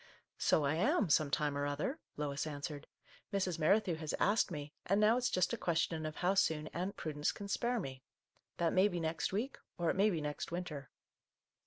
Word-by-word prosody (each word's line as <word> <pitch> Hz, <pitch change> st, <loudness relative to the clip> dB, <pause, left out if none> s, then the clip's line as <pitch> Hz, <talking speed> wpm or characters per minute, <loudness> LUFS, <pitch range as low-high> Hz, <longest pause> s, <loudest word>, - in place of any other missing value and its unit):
" -, -, -56 dB
So 150 Hz, -, +4 dB
I 140 Hz, -, +2 dB
am, 215 Hz, -, +2 dB
some 150 Hz, 0 st, +4 dB
time 145 Hz, 0 st, 0 dB
or 145 Hz, 0 st, 0 dB
other," 150 Hz, -, -2 dB, 0.2 s
Lois 145 Hz, 0 st, -2 dB
answered. 145 Hz, 0 st, -5 dB, 0.2 s
" -, -, -26 dB
Mrs. 185 Hz, -4 st, 0 dB
Merrithew 185 Hz, +3 st, +3 dB
has 155 Hz, -1 st, -3 dB
asked 210 Hz, +3 st, +3 dB
me, 150 Hz, -3 st, -6 dB
and 195 Hz, +3 st, +3 dB
now 215 Hz, +2 st, +5 dB
it's 250 Hz, 0 st, +1 dB
just 180 Hz, -1 st, +1 dB
a -, -, 0 dB
question 165 Hz, -2 st, 0 dB
of 155 Hz, -, -6 dB
how 180 Hz, +2 st, +2 dB
soon 155 Hz, -5 st, +1 dB
Aunt 185 Hz, +3 st, -3 dB
Prudence 150 Hz, -1 st, -1 dB
can 200 Hz, -, -7 dB
spare 240 Hz, +4 st, 0 dB
me. 130 Hz, -7 st, -6 dB, 0.6 s
That 170 Hz, -1 st, +1 dB
may 190 Hz, +2 st, +5 dB
be 175 Hz, -4 st, -2 dB
next 160 Hz, 0 st, -1 dB
week, 225 Hz, +8 st, -2 dB
— -, -, -55 dB
or 170 Hz, -2 st, +2 dB
it -, -, -3 dB
may 200 Hz, +3 st, +4 dB
be 170 Hz, -6 st, -1 dB
next 150 Hz, +1 st, -4 dB
winter 165 Hz, -7 st, -5 dB
165 Hz, 215 wpm, -35 LUFS, 150-195 Hz, 0.6 s, now